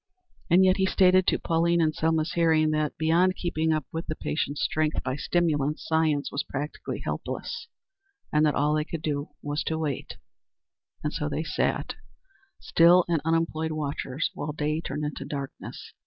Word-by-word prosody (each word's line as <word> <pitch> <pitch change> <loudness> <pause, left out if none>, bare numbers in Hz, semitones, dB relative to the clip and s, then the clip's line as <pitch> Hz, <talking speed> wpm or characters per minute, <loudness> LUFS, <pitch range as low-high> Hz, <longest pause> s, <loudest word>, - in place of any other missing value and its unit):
And 185 +3 +6
yet 185 0 +4
he 190 -1 +2
stated 185 -1 +4
to - - +3
Pauline 170 +1 +1
in 155 -2 +2
Selma's 160 0 0
hearing 160 -2 +3
that, 155 -1 -1
beyond 170 +4 +3
keeping 160 -3 0
up 155 -2 0
the 160 -1 -3
patient's 145 -2 -2
strength 155 0 0
by 130 0 -2
stimulants, 150 -2 0
science 160 -3 +1
was 140 - -1
practically 145 +2 -5
helpless, - - -4 0.7
and 150 0 +4
that 150 -1 +3
all 150 +1 +2
they 155 0 +1
could 155 0 -6
do 145 -1 -2
was 145 +1 -2
to 160 - -1
wait. 150 -4 -3 0.9
And 150 - -2
so 150 - -2
they 150 +2 -2
sat, - - -1 0.7
still 175 +2 +5
and 165 -3 +1
unemployed 160 -1 0
watchers, 150 +1 -2
while 150 -5 -4
day 150 +1 -1
turned 150 -1 -3
into 150 -2 -4
darkness. 140 -1 -7
155 Hz, 165 wpm, -27 LUFS, 150-165 Hz, 0.9 s, And